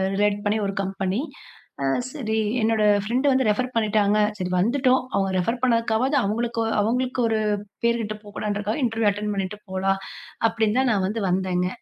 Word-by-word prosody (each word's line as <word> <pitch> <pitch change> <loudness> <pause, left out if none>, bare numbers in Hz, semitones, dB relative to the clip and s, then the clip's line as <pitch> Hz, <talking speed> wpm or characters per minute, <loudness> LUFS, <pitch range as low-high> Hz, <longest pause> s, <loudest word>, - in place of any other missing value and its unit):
Relate 205 0 +1
பண்ணி 215 +1 +1
ஒரு 195 - -4
company. 195 +3 -2 0.6
அ - - +1 0.3
சரி, 220 -7 -2 0.2
என்னோட 220 -1 +2 0.2
ஃப்ரெண்ட் 245 +6 -1
வந்து 260 0 +2
ரெஃபர் 250 +4 0
பண்ணிட்டாங்க. 215 -2 +2 0.2
சரி, 180 -1 -3
வந்துட்டோம், 255 +6 +3
அவுங்க 195 -1 +1
ரெஃபர் 230 +7 0
பண்ணதுக்காகாவது 230 +2 +2
அவுங்களுக் 230 +3 -1 0.2
அவங்களுக்கு 250 +4 0
ஒரு 220 -1 +1 0.5
பேரு 235 0 +3
கெட்டு 215 -1 -4
போகக் 205 -1 -14
கூடாதுன்றதுக்காக, 210 +5 -2
இன்டர்வியூ 225 -2 +1
அட்டென்ட் 210 +1 -3
பண்ணிட்டு 195 +1 -3
போலாம் 195 +1 0 0.5
அப்படின்னு 225 +2 +1
தான், 265 - +2
நான் 190 -2 +1
வந்து 215 +3 -3
வந்தேங்க. 180 -1 0
215 Hz, 160 wpm, -24 LUFS, 200-235 Hz, 0.6 s, வந்துட்டோம்